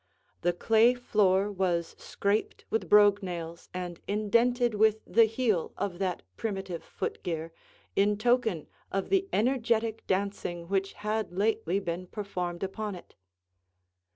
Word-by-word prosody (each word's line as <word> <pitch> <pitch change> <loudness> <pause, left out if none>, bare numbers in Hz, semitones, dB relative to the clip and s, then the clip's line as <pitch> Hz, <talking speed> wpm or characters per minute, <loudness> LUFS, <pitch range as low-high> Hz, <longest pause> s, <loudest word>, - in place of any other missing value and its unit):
The 175 - +2
clay 225 +6 +4
floor 205 -4 +2
was 180 -4 -1
scraped 200 +2 -1
with 225 - -1
brogue 205 0 +6
nails 170 -3 -6
and 180 -2 -5
indented 235 +4 +2
with 215 +1 +2
the 230 0 +5
heel 220 -6 0
of 185 -3 -3
that 185 -3 -2
primitive 195 -5 -4
foot - - -5
gear, 165 -1 -4 0.4
in 205 +1 +3
token 225 -7 +1 0.3
of 195 0 -2
the 390 0 +2
energetic 230 -2 +1
dancing 185 -3 -2
which 195 +1 0
had 215 -1 -2
lately 200 -3 +1
been 180 -1 -4
performed 180 -4 -4
upon 205 +1 -3
it. 175 - -13
200 Hz, 130 wpm, -29 LUFS, 180-220 Hz, 0.4 s, brogue